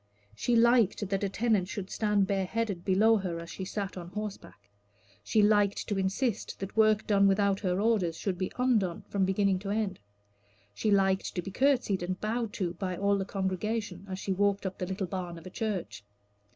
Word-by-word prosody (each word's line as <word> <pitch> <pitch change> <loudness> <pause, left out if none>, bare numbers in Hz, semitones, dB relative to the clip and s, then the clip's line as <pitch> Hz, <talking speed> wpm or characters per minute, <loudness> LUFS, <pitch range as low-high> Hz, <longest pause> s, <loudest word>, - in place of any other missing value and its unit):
She 240 - +1
liked 230 -3 +4
that 195 +1 -1
a 200 - +1
tenant 210 -2 +1
should 195 -1 -6
stand 210 -2 +2
bareheaded 195 0 -1
below 215 +4 +4
her 180 -4 -3
as 170 0 -8
she 190 - -5
sat 195 -1 -4
on 175 -1 -7
horseback. 200 - -7 0.6
She 210 - +3
liked 205 -1 +3
to 205 -3 -1
insist 195 +5 -1
that 195 0 -6
work 215 -1 +4
done 200 -1 +4
without 195 0 +2
her 185 -2 0
orders 200 -7 +1
should 195 -3 -2
be 185 +1 -3
undone 225 -9 +1
from 195 -2 +1
beginning 190 0 +1
to 195 +1 -6
end. 210 -1 -1 0.7
She 215 - -1
liked 195 -1 +2
to 180 - -1
be 195 - -6
courtesied 245 -6 +2
and 185 +1 -3
bowed 225 +1 -2
to 175 -3 -2
by 185 0 -4
all 200 +1 +2
the 195 - -2
congregation 195 0 -3
as 185 - -4
she 195 0 -2
walked 200 +1 +1
up 190 0 -4
the 180 - -2
little 190 +1 -2
barn 175 -1 -5
of 165 - -12
a 185 - -8
church. 205 - -3
195 Hz, 195 wpm, -29 LUFS, 185-215 Hz, 0.7 s, liked